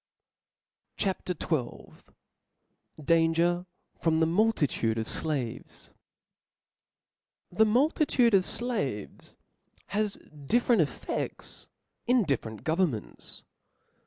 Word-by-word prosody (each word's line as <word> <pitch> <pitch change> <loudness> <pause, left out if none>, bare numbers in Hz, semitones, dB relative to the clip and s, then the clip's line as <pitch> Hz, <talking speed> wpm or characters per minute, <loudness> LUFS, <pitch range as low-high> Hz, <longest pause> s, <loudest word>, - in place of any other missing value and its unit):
CHAP. 190 -2 -2
XII. 155 -7 -3 1.1
Danger 165 +3 +2 0.3
from 160 -1 +2
the 160 - +4
Multitude 165 - +1
of 110 0 -2
Slaves. 140 -8 -4 1.6
fTPHE 220 +5 +4
multitude 250 -1 +3
of 190 -2 +5
flaves 180 - -2 0.5
has 210 0 0 0.3
different 240 - +3
ef 150 - +1
'*' - - -14
fefts - - -5 0.4
in 245 -1 +4
different 115 - -3
governments. 160 - -2
175 Hz, 85 wpm, -28 LUFS, 145-215 Hz, 1.6 s, of